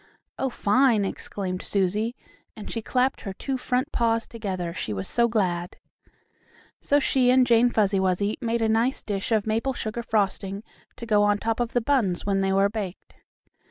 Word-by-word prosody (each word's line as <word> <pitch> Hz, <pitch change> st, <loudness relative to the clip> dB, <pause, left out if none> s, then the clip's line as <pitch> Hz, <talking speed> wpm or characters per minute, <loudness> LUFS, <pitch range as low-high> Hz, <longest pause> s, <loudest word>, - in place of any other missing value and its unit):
"Oh, 265 Hz, -, 0 dB
fine!" 230 Hz, -1 st, +3 dB
exclaimed 185 Hz, -1 st, -4 dB
Susie, 210 Hz, +5 st, 0 dB, 0.4 s
and 215 Hz, -, -8 dB
she 230 Hz, -, -3 dB
clapped 255 Hz, +3 st, 0 dB
her 195 Hz, -, -5 dB
two 270 Hz, +7 st, -3 dB
front 255 Hz, +4 st, -1 dB
paws 230 Hz, -1 st, +1 dB
together, 185 Hz, -7 st, -4 dB
she 110 Hz, -11 st, -4 dB
was 95 Hz, -1 st, -4 dB
so 235 Hz, 0 st, +3 dB
glad. 180 Hz, -6 st, -1 dB, 1.0 s
So 285 Hz, -, +2 dB
she 260 Hz, -3 st, +2 dB
and 255 Hz, 0 st, +5 dB
Jane 240 Hz, 0 st, +4 dB
Fuzzy 205 Hz, -4 st, +2 dB
Wuzzy 190 Hz, +2 st, +1 dB
made 230 Hz, -1 st, 0 dB
a -, -, +3 dB
nice 230 Hz, +4 st, +1 dB
dish 200 Hz, +1 st, -3 dB
of 215 Hz, -2 st, +2 dB
maple 225 Hz, +5 st, 0 dB
sugar 230 Hz, -1 st, -4 dB
frosting 200 Hz, -2 st, -1 dB, 0.3 s
to 235 Hz, -, -8 dB
go 210 Hz, -2 st, +3 dB
on 205 Hz, 0 st, +3 dB
top 225 Hz, +2 st, -2 dB
of 240 Hz, -1 st, -1 dB
the 245 Hz, -, +2 dB
buns 225 Hz, -9 st, 0 dB
when 195 Hz, -1 st, +1 dB
they 195 Hz, 0 st, +1 dB
were 195 Hz, +1 st, +4 dB
baked. 200 Hz, -3 st, -6 dB
215 Hz, 180 wpm, -25 LUFS, 195-235 Hz, 1.0 s, and